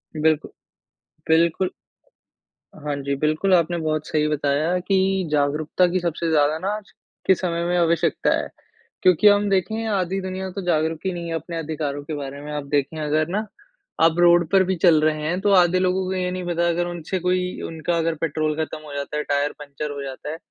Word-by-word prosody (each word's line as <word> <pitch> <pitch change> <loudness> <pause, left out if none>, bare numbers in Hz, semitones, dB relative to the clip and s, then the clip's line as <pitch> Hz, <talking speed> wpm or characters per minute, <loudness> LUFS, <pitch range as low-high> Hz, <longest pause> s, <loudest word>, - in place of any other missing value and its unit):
बिल्कुल, 155 0 +1 0.8
बिल्कुल। 170 +3 +3 1.1
हाँ 145 -1 -2
जी, 140 0 -2
बिल्कुल 155 +7 +1
आपने 170 0 +1
बहुत 155 -2 -2
सही 150 -1 +1
बताया 150 +3 +1
कि 190 0 +1
जागरूकता 150 +4 +1
की 185 +1 0
सबसे 170 -1 -2
ज़्यादा 150 0 +3
ना 190 - -4
आज 210 -1 -9 0.4
के 190 - +7
समय 170 -2 -2
में 175 +1 +1
आवश्यकता 170 -1 +2
है। - - -3 0.5
क्योंकि 185 +1 +5
हम 205 0 +5
देखें 220 +4 0
आधी 195 -2 0
दुनिया 190 0 -4
तो 195 +2 -5
जागरूक 160 -2 +1
ही 190 - +1
नहीं 170 -1 -5
है 165 - -2
अपने 165 +1 -5
अधिकारों 150 -3 -3
के 155 - -6
बारे 140 0 -6
में, 150 +1 -7
आप 150 -1 -3
देखें 145 +2 0
अगर 155 +1 +1
ना 210 +4 -1 0.6
आप 165 0 +5
रोड 175 -1 +5
पर 195 -1 +5
भी 190 0 0
चल 160 -4 +6
रहे 155 0 +1
हैं 175 +4 -1
तो 205 0 +2
आधे 180 -1 +5
लोगों 185 +1 +1
को 185 - -2
ये 180 -1 -1
नहीं 185 -1 -4
पता 170 0 +1
अगर 175 +1 0
उनसे 175 +2 -4
कोई 180 +1 -1
उनका 165 +1 -2
अगर 165 0 0
पेट्रोल 155 -1 0
खत्म 155 - -7
हो 145 - -9
जाता 140 +1 -4
है 150 - -1
टायर 145 +1 0
पंक्चर 145 +1 -6
हो 145 -1 -6
जाता 135 +2 -7
है, 160 - -5
165 Hz, 200 wpm, -23 LUFS, 150-180 Hz, 1.1 s, के